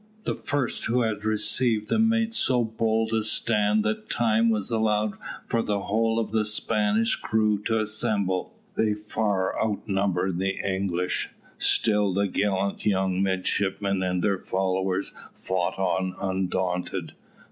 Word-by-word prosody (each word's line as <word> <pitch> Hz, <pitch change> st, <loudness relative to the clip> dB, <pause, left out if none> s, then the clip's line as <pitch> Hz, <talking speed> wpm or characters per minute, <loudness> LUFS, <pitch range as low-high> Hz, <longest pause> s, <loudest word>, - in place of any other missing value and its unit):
The -, -, -1 dB
first 145 Hz, -4 st, -2 dB
who 120 Hz, +1 st, +2 dB
had 105 Hz, -2 st, -2 dB
received 110 Hz, +1 st, +1 dB
them 225 Hz, 0 st, +3 dB
made 225 Hz, 0 st, +1 dB
so 125 Hz, -, +2 dB
bold 110 Hz, 0 st, 0 dB
a 110 Hz, -, +2 dB
stand 105 Hz, -1 st, +2 dB
that 110 Hz, 0 st, -2 dB
time 115 Hz, 0 st, +2 dB
was 110 Hz, 0 st, 0 dB
allowed 110 Hz, -2 st, +1 dB, 0.3 s
for 115 Hz, -, 0 dB
the 105 Hz, -2 st, -1 dB
whole 110 Hz, +3 st, +1 dB
of 115 Hz, -2 st, -1 dB
the 110 Hz, -1 st, +2 dB
Spanish 105 Hz, +1 st, +1 dB
crew 110 Hz, -2 st, +1 dB
to 115 Hz, -, +1 dB
assemble. 105 Hz, -3 st, -1 dB, 0.2 s
They 110 Hz, -1 st, +1 dB
far 105 Hz, -2 st, -1 dB
outnumbered 95 Hz, -4 st, -1 dB
the 95 Hz, 0 st, -1 dB
English. 95 Hz, -2 st, -1 dB, 0.3 s
Still 105 Hz, -4 st, +2 dB
the 100 Hz, 0 st, +2 dB
gallant 100 Hz, 0 st, -1 dB
young 95 Hz, -2 st, +1 dB
midshipmen 95 Hz, +1 st, 0 dB
and 90 Hz, -1 st, -1 dB
their 100 Hz, -2 st, +1 dB
followers 95 Hz, 0 st, -1 dB, 0.2 s
fought 95 Hz, -1 st, -2 dB
on 95 Hz, -1 st, 0 dB
undaunted. 95 Hz, -2 st, -2 dB
105 Hz, 135 wpm, -26 LUFS, 95-110 Hz, 0.3 s, them